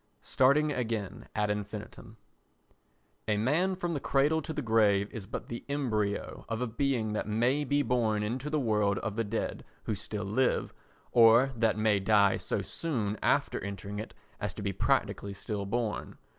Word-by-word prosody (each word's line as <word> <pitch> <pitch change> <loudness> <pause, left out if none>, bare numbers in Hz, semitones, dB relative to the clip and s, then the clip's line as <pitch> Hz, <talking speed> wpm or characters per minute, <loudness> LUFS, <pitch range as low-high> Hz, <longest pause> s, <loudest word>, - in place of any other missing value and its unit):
Starting 150 +4 +3
again 115 -7 -3
ad 105 -1 +1
Infinitum 105 +2 -6 1.1
A 105 -1 +2
man 160 - +2
from 175 -2 -2
the 145 - -1
cradle 145 +4 +2
to 160 - -6
the 150 -2 -3
grave 105 -3 +3
is 100 -4 -7
but - - -5
the 120 - -6
embryo 110 -8 -1
of 115 -1 -2
a 125 - 0
being 115 -2 -1
that 105 - -2
may 120 +7 +2
be 145 +1 +1
born 110 -4 +1
into 125 +7 -3
the 155 0 +1
world 105 -5 +1
of 110 -2 -3
the 115 - 0
dead 110 +1 -3 0.2
who 110 - -2
still 105 +1 -5
live, 125 +6 +1 0.4
or 120 +3 +6
that 110 -2 +2
may 110 -2 +3
die 100 -1 +4
so - - -2
soon 115 -11 -2
after - - +1
entering 100 +1 -5
it 110 - -7 0.2
as 105 -3 -3
to 105 - -6
be 100 -1 -1
practically 100 +1 0
still 100 0 -4
born. 115 -1 -2
110 Hz, 170 wpm, -30 LUFS, 105-130 Hz, 1.1 s, or